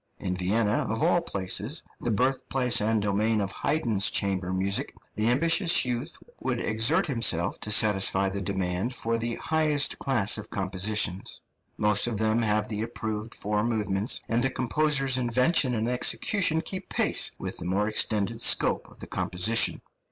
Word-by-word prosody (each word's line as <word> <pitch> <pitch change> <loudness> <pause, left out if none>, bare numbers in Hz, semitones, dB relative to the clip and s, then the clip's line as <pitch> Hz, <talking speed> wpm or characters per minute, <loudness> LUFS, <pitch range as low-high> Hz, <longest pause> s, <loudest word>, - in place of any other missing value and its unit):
In 90 -1 -4
Vienna, 105 +4 0
of 110 +6 -2
all 175 +1 +2
places, 105 - -1 0.2
the - - -4
birthplace 125 +1 +1
and 110 0 0
domain 105 +2 0
of 100 -1 -2
Haydn's 115 -10 0
chamber 95 -2 -1
music, 95 +2 -1 0.2
the 110 +2 0
ambitious 165 +7 +3
youth 125 +6 -4 0.2
would 125 -2 -2
exert 110 +9 +1
himself 115 - +1
to 105 - -1
satisfy 100 -2 +4
the 100 +1 -4
demand 95 +4 -2
for 115 0 -2
the 115 0 -3
highest 155 -2 +1
class 110 -6 +1
of 105 - -9
compositions. 95 0 -1 0.3
Most 105 +1 +2
of 115 -3 -3
them 110 +2 +1
have 105 -1 +1
the 105 -1 -5
approved 110 -1 -5
four 105 +1 -2
movements, 105 -2 0
and 115 +2 +1
the 135 - +2
composer's 135 0 +1
invention 125 +2 +1
and 110 +1 -2
execution 160 - +1
keep 185 +3 -6
pace - - +2
with - - -4
the - - -5
more 100 +4 -1
extended 110 +1 -1
scope - - +2
of - - -18
the - - -8
composition. 90 +6 +1
110 Hz, 160 wpm, -26 LUFS, 100-125 Hz, 0.3 s, satisfy